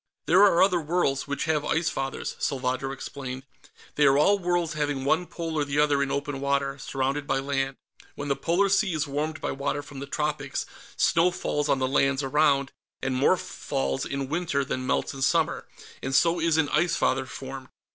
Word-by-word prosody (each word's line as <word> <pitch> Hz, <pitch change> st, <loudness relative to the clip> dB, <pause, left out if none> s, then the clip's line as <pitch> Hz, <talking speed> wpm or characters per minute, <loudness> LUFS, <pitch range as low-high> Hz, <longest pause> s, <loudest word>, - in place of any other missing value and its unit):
"There 185 Hz, +4 st, +5 dB
are 195 Hz, -4 st, +6 dB
other 180 Hz, -3 st, +3 dB
worlds 150 Hz, -4 st, 0 dB
which 140 Hz, 0 st, -2 dB
have 155 Hz, -2 st, +1 dB
Ice 165 Hz, +2 st, +1 dB
Fathers," 135 Hz, 0 st, -4 dB
Salvadro 130 Hz, 0 st, -1 dB
explained. 135 Hz, -1 st, -6 dB, 0.5 s
"They 145 Hz, -1 st, +4 dB
are 135 Hz, 0 st, +5 dB
all 200 Hz, +7 st, +4 dB
worlds 175 Hz, -3 st, 0 dB
having 145 Hz, -3 st, -2 dB
one 160 Hz, +5 st, +2 dB
pole 165 Hz, -1 st, -5 dB
or -, -, +2 dB
the 140 Hz, 0 st, -3 dB
other 145 Hz, -1 st, +3 dB
in 140 Hz, -, 0 dB
open 140 Hz, 0 st, -2 dB
water, 140 Hz, 0 st, 0 dB
surrounded 135 Hz, +2 st, -2 dB
by 135 Hz, -, +1 dB
land. 135 Hz, 0 st, -1 dB, 0.4 s
When 145 Hz, -, -5 dB
the 140 Hz, -, +1 dB
polar 175 Hz, +7 st, +1 dB
sea 195 Hz, -2 st, +2 dB
is 155 Hz, 0 st, 0 dB
warmed 150 Hz, +2 st, -3 dB
by -, -, -2 dB
water 140 Hz, +1 st, -2 dB
from 145 Hz, -1 st, -10 dB
the 140 Hz, -, -6 dB
tropics, 150 Hz, -1 st, -2 dB, 0.3 s
snow 170 Hz, +2 st, +4 dB
falls 150 Hz, -4 st, -2 dB
on 135 Hz, -, +3 dB
the 130 Hz, 0 st, 0 dB
lands 135 Hz, +1 st, +2 dB
around, 140 Hz, -1 st, +2 dB, 0.3 s
and 135 Hz, -, 0 dB
more 130 Hz, -, +4 dB
falls 65 Hz, 0 st, -3 dB
in 135 Hz, -1 st, -3 dB
winter 150 Hz, -3 st, -1 dB
than 130 Hz, 0 st, -3 dB
melts -, -, 0 dB
in 135 Hz, -, -8 dB
summer, 135 Hz, -, +1 dB, 0.3 s
and 135 Hz, +1 st, -2 dB
so 170 Hz, +4 st, +4 dB
is 165 Hz, -1 st, +2 dB
an 155 Hz, -2 st, +2 dB
Ice 165 Hz, +3 st, +2 dB
Father 130 Hz, 0 st, +1 dB
formed. 135 Hz, 0 st, -8 dB
145 Hz, 195 wpm, -26 LUFS, 135-160 Hz, 0.5 s, are